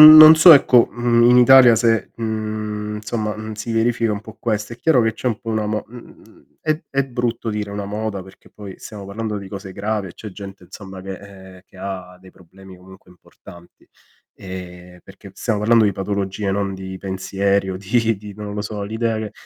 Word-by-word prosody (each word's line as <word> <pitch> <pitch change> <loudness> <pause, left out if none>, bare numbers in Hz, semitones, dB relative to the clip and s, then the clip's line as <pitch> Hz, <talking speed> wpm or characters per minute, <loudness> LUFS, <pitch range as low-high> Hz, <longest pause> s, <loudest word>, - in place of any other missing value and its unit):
non 155 0 +12
non 155 +1 +11
so 165 +2 +9
ecco, 125 -3 +5
mhmm, 120 0 +2
in 125 - +6
Italia 125 -1 +7
se, 115 -1 +1
mhmm, 110 -1 -4
insomma, 105 0 -3
n 110 0 -7
si 110 +2 -6
verifica 115 -1 +1
un 105 - -5
po' 110 0 -12
questo. 110 -1 -2
È 120 - -8
chiaro 130 -4 +3
che 110 0 +1
c'è 125 - -8
un 115 -2 -1
po' 115 - -6
una 110 -1 -1
mo 105 -1 -2
mhmm, 120 +2 -17
è 155 +1 -1
è 140 0 0
brutto 120 -3 -3
dire 105 -1 -4
una 100 0 -5
moda 105 -1 -4
perché 95 +1 -18
poi 100 -3 -11
siamo 105 -2 -10
parlando 105 +2 -5
di 100 -1 -8
cose 95 -1 -8
gravi 105 +1 -3
e 85 - -13
c'è 110 - -9
gente 95 0 -10
insomma 95 +1 -11
che 95 0 -6
ehm, 95 -2 -14
che - - -21
ha 90 -1 -7
dei 95 0 -17
problemi 95 +1 -16
comunque 95 0 -17
importanti. 85 -1 -17 0.5
Ehm, 90 -1 -10
perché 95 +1 -14
stiamo 110 -3 -2
parlando 115 +1 +4
di 100 - +2
patologie, 100 +1 -3
non 100 0 -2
di 95 0 -8
pensieri 95 +1 -1
o 95 - -4
di 110 +3 0
di, 100 0 -11
non 105 0 -7
lo 105 - -3
so, 105 -1 -5
l'idea 110 +2 -2
che 110 -2 -6
105 Hz, 205 wpm, -20 LUFS, 95-115 Hz, 0.5 s, non